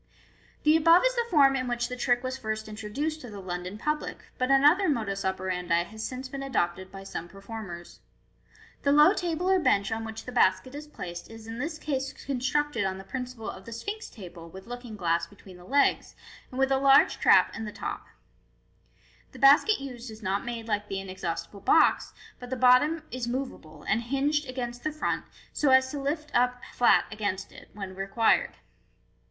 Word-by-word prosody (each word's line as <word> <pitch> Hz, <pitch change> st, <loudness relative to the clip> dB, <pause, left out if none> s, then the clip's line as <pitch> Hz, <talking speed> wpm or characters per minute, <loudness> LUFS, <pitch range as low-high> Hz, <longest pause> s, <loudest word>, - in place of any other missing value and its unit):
The 305 Hz, +1 st, +5 dB
above 330 Hz, +5 st, +6 dB
is -, -, +3 dB
the 475 Hz, -1 st, -1 dB
form 275 Hz, -5 st, +5 dB
in 255 Hz, -1 st, -1 dB
which 240 Hz, 0 st, -1 dB
the 250 Hz, -, -5 dB
trick 245 Hz, 0 st, +1 dB
was 255 Hz, 0 st, -2 dB
first 220 Hz, -3 st, -4 dB
introduced 220 Hz, +9 st, -4 dB
to 245 Hz, -, -9 dB
the 205 Hz, -2 st, -8 dB
London 180 Hz, +1 st, -5 dB
public, 300 Hz, +6 st, -3 dB
but 255 Hz, +1 st, +1 dB
another 295 Hz, +8 st, +5 dB
modus 215 Hz, -8 st, -1 dB
operandi 180 Hz, -2 st, 0 dB
has 220 Hz, +5 st, -8 dB
since 255 Hz, +3 st, -5 dB
been 275 Hz, +1 st, -6 dB
adopted 190 Hz, -8 st, -2 dB
by 195 Hz, 0 st, -9 dB
some 175 Hz, -3 st, -6 dB
performers. 195 Hz, -3 st, -9 dB, 0.8 s
The 280 Hz, -, +2 dB
low 300 Hz, +6 st, +7 dB
table 350 Hz, -2 st, -2 dB
or 380 Hz, 0 st, +4 dB
bench 200 Hz, -, +2 dB
on 225 Hz, 0 st, -2 dB
which 220 Hz, 0 st, -7 dB
the 250 Hz, -, -6 dB
basket 190 Hz, +1 st, +2 dB
if 300 Hz, +1 st, -9 dB
placed 175 Hz, -7 st, -7 dB
is 225 Hz, -1 st, -11 dB
in 225 Hz, +1 st, -7 dB
this 310 Hz, +4 st, -3 dB
case 270 Hz, -3 st, -3 dB
constructed 275 Hz, -1 st, 0 dB
on 190 Hz, -1 st, -2 dB
the 195 Hz, -, -9 dB
principle 250 Hz, +1 st, -6 dB
of 190 Hz, -, -7 dB
the 230 Hz, -, -9 dB
Sphinx 410 Hz, -, -5 dB
table 175 Hz, -5 st, -11 dB
with 190 Hz, +3 st, -11 dB
looking 245 Hz, -1 st, -8 dB
glass 170 Hz, -3 st, 0 dB
between 195 Hz, -3 st, -15 dB
the 180 Hz, -, -15 dB
legs, 280 Hz, +5 st, +2 dB, 0.3 s
and 255 Hz, -, -9 dB
with 270 Hz, 0 st, +2 dB
a 270 Hz, -, +4 dB
large 275 Hz, 0 st, +5 dB
trap -, -, +5 dB
in 225 Hz, -, -5 dB
the 210 Hz, -, -5 dB
top -, -, -6 dB, 1.3 s
The -, -, -11 dB
basket 285 Hz, +10 st, +6 dB
used 250 Hz, -3 st, -7 dB
is 220 Hz, 0 st, -11 dB
not 195 Hz, +1 st, -1 dB
made 235 Hz, -1 st, -5 dB
like 210 Hz, -1 st, -1 dB
the 195 Hz, -1 st, -3 dB
inexhaustible 185 Hz, +1 st, -5 dB
box, 315 Hz, +10 st, +4 dB, 0.3 s
but 245 Hz, -, -9 dB
the 260 Hz, -, -2 dB
bottom 260 Hz, +6 st, +4 dB
is 250 Hz, -1 st, -3 dB
moveable, 240 Hz, -, -5 dB
and 220 Hz, -, +1 dB
hinged 275 Hz, +4 st, 0 dB
against 245 Hz, -1 st, -5 dB
the 310 Hz, -, -1 dB
front, 305 Hz, -, -2 dB, 0.3 s
so 295 Hz, -, +2 dB
as 260 Hz, 0 st, +5 dB
to 290 Hz, -, -4 dB
lift 295 Hz, +2 st, -3 dB
up 250 Hz, 0 st, +2 dB
flat 240 Hz, -, +4 dB
against 205 Hz, -2 st, -3 dB
it -, -, -14 dB
when 195 Hz, -2 st, -7 dB
required. 195 Hz, +4 st, +1 dB
240 Hz, 190 wpm, -28 LUFS, 195-275 Hz, 1.3 s, low